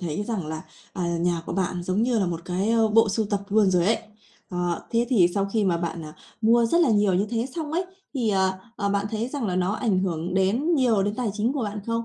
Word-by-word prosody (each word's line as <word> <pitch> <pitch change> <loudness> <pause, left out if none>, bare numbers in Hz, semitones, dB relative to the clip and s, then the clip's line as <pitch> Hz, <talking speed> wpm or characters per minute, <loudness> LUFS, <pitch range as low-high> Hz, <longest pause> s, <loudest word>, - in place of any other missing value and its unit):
thấy 175 +3 -3
rằng 205 -9 -3
là, 160 0 -5 0.3
à, 185 - -4 0.2
nhà 170 -1 0
của - - -4
bạn 180 -1 -1
giống 185 +5 0
như 240 -2 +2
là 190 - +1
một 170 -1 -3
cái, 185 +4 -1
ơ, 225 -1 +3
bộ 225 0 +4
sưu 215 +2 0
tập 205 -1 -1
luôn 205 -2 +4
rồi 180 0 +2
ấy. 225 - +3 0.5
Ờ, 175 -1 -2
thế 235 +1 +1
thì 190 -9 +5
sau 200 -1 +1
khi 215 -3 +2
mà 175 -3 +2
bạn, 170 -1 -4
à, 155 - -10 0.3
mua 230 +1 +4
rất 340 +9 +3
là 300 -8 +4
nhiều 205 -3 +3
như 200 +3 +1
thế 235 +1 -1
xong 310 -2 -4
ấy, 355 +3 0 0.3
thì, 235 -5 +1
ờ, 190 -1 +1 0.2
ờ, 200 -2 -1
bạn 200 0 0
thấy 225 +2 -2
rằng 270 -5 -3
là 180 -1 -1
nó 185 +2 +1
ảnh 215 -4 0
hưởng 180 -1 -2
đến 230 - +2
nhiều 235 -8 +3
đến 205 +1 -1
tài 240 -4 -1
chính 220 +5 0
của 275 -4 -2
bạn 205 0 -4
không? 230 0 -1
205 Hz, 265 wpm, -25 LUFS, 180-230 Hz, 0.5 s, thì